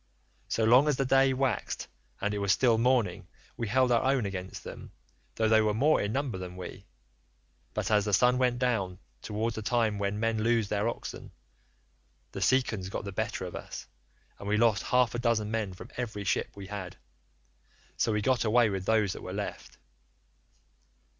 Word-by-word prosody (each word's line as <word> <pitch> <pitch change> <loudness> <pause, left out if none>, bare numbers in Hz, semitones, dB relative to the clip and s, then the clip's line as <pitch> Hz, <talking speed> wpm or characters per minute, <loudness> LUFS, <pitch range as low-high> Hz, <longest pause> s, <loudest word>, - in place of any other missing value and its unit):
76 - - -1
So 115 - +1
long 125 +6 +6
as 150 - +3
the 135 - 0
day 135 +1 +4
waxed 130 -2 -1 0.3
and 105 - 0
it 105 - -2
was 100 -1 +1
still 115 +2 +3
morning, 110 -7 +1 0.3
we 115 - -3
held 125 +3 +3
our 120 - +4
own 135 -4 +1
against 95 -1 -5
them, - - -9 0.4
though 110 - +2
they 110 0 +5
were 105 -1 +1
more 150 +7 +3
in 100 - -1
number 130 -6 -2
than 90 -1 -7
we; 95 +1 -8 0.9
but - - -1
as 105 -1 +3
the 105 - -1
sun 125 +5 +4
went 125 -1 +2
down, 110 -8 0 0.2
towards 110 +2 -2
the 110 - -4
time 110 -2 +1
when 100 +1 -1
men 115 -1 0
loose 115 -2 +2
their 105 +1 0
oxen, - - -7 1.0
the - - -6
Cicons 110 -4 +1
got 100 - -5
the 100 - -4
better 110 -1 -3
of 90 - -7
us, - - -7 0.5
and 100 - -7
we 105 +1 +2
lost 110 -2 +3
half 125 -2 +2
a 120 - -2
dozen 115 -3 +1
men 110 -4 -1
from 90 - -11
every 110 -4 -4
ship 95 - 0
we 100 -1 -8
had; 95 -3 -7 1.0
so - - +1
we 105 -1 0
got 130 +2 +2
away 115 0 +4
with 95 -1 -4
those 110 -4 +2
that - - -9
were - - -6
left. - - -6
110 Hz, 195 wpm, -29 LUFS, 100-125 Hz, 1.0 s, long